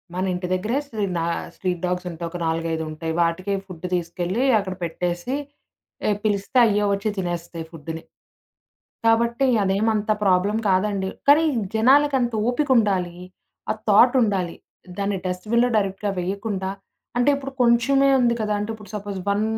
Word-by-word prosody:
మన 185 +1 -1
ఇంటి 180 0 -3
దగ్గర 210 +6 -1
స్ట్రీ 220 -7 -3
నా 165 - -1 0.3
స్ట్రీట్ 180 -2 -2
డాగ్సుంటాయి. 180 -2 -3
ఒక 175 - -5
నాలుగైదుంటాయి. 160 -1 -2
వాటికే 175 +4 0
ఫుడ్ 180 -1 -9
తీసుకెళ్లి, 175 +6 -2 0.2
అక్కడ 190 -2 -4
పెట్టేసి, 175 +6 -2 0.7
ఎ - - +3
పిలిస్తే 205 +3 0
అయ్యే 210 -2 +2
ఒచ్చి 200 +2 -1
తినేస్తాయి 170 -2 -4
ఫుడ్డునీ. 160 0 -7 1.0
కాబట్టి, 235 +3 +3 0.2
అదేమంత 210 +2 +1
ప్రాబ్లం 195 +3 +3
కాదండి. 190 0 +1 0.2
కానీ, 300 +3 +7 0.3
జనాలకంత 265 +1 +4 0.2
ఓపికుండాలి. 210 - +1 0.5
ఆ - - +4 0.2
థాటుండాలి. 205 -5 +4 0.4
దాన్ని 200 -1 -1
డస్ట్‌బిన్‌లో 215 +7 +1
డైరెక్ట్‌గా 195 0 -1
వేయకుండా 195 +1 -3 0.5
అంటే 245 +4 +4
ఇప్పుడు 275 -1 -5
కొంచెమే 250 +3 +4
ఉంది 240 -1 +3
కదా! 210 -1 0
అంటే 210 +2 -3
ఇప్పుడు 210 -3 -13
సపోజ్ 205 -2 -5
వన్ 200 +1 +2
200 Hz, 130 wpm, -23 LUFS, 180-225 Hz, 1.0 s, కానీ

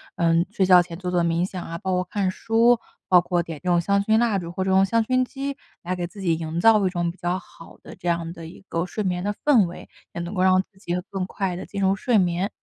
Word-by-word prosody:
嗯， 165 0 +3
睡 195 -2 +1
觉 180 -1 +7
前 170 -1 -7
做 180 -1 -4
做 175 -1 +2
冥 170 +1 +1
想 185 -2 -6
啊， 165 0 -6
包 190 +2 -3
括 180 0 +1
看 195 0 -1
书， 230 +3 +3 0.3
包 180 -2 +6
括 175 -1 0
点 160 -3 -8
这 180 - -1
种 175 -1 +4
香 200 +3 +1
薰 220 +1 +3
蜡 230 -4 +2
烛， 170 -1 -7
或 190 +1 -2
者 190 - 0
用 190 +1 +5
香 230 +2 +1
薰 255 +2 +1
机， 275 +2 -5 0.3
来 180 +1 -2
给 175 -1 -3
自 200 +4 -14
己 170 -3 +1
营 165 +1 -4
造 215 0 +5
一 - - +2
种 175 -2 -1
比 180 - -19
较 175 +1 -1
好 165 -3 -16
的 - - -11
这 175 - -8
样 170 -1 -1
的 165 -2 -10
一 170 - -13
个 165 +2 -2
睡 215 - -4
眠 180 -1 -1
的 205 +1 -1
氛 245 -10 +5
围， 170 - -10 0.3
也 170 - -4
能 175 +4 -5
够 185 - -1
让 185 0 +5
自 190 - -32
己 175 -3 -4 0.2
更 190 -2 -3
快 190 -1 -3
地 - - -6
进 200 -1 -5
入 190 0 +3
睡 225 +2 +1
眠。 180 +2 +1
185 Hz, 300 characters per minute, -23 LUFS, 175-200 Hz, 0.3 s, 觉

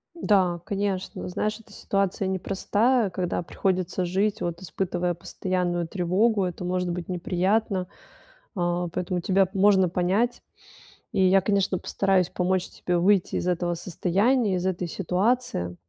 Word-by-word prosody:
Да, 185 - +2
конечно, 200 -3 -3
знаешь, 215 +4 -2
эта 225 - -17
ситуация 195 -1 -1
непростая, 205 +5 +1
когда 180 -1 -2
приходится 185 +1 -1
жить, 200 +4 0
вот, 170 +1 -3
испытывая 180 0 -2
постоянную 175 -1 -2
тревогу, 195 +4 +1
это 180 0 -5
может 180 0 -1
быть 180 +1 -5
неприятно. 185 +2 0 0.7
А, 175 -1 -1
поэтому 180 0 -2
тебя 190 0 +2
можно 195 -2 +4
понять. 190 +7 0 0.7
И 190 - +2
я, 190 +1 +5
конечно, 195 -2 +1
постараюсь 190 -3 +1
помочь 185 0 0
тебе 180 -1 -2
выйти 190 +1 +2
из 180 - -2
этого 175 -1 0
состояния, 195 +6 +1
из 180 +1 -2
этой 180 -1 -1
ситуации, 185 - -1
185 Hz, 130 wpm, -25 LUFS, 175-200 Hz, 0.7 s, я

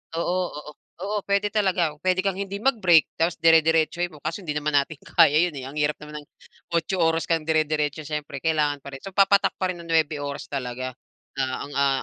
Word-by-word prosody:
oo, 170 +2 0 0.2
oo, 150 0 -8 0.3
oo, 210 +1 -2
puwede 200 +1 +1
talaga. 185 -7 +1
Puwede 185 +1 +1
kang 195 -1 -1
hindi 200 0 -4
mag-break 190 - +4
tapos 165 +1 +1
dire-diretsohin 165 +1 +3
mo 150 - -13
kaso 165 +6 -3
hindi 150 -3 -4
naman 150 0 -1
natin 145 +3 +1
kaya 145 - +4
'yon, 165 - -8
eh, 130 - -7
ang 140 - -10
hirap 150 0 0
naman 150 0 -8
ng - - -27 0.5
8 170 +3 0
oras 165 -1 +1
kang 165 -2 +1
dire-diretso. 155 -1 0
Siyempre, 150 -2 -5
kailangan 150 -3 +1
pa 140 - -9
rin. 135 - -11
So 195 - -7
papatak 200 0 +4
pa 185 - +1
rin 175 - -9
ng - - -13
9 160 -1 +2
oras 140 0 -5
talaga 130 -1 -4 0.4
na - - +2 0.2
ang, 145 - -11
ah, 140 -1 +2
160 Hz, 210 wpm, -24 LUFS, 150-180 Hz, 0.5 s, mag-break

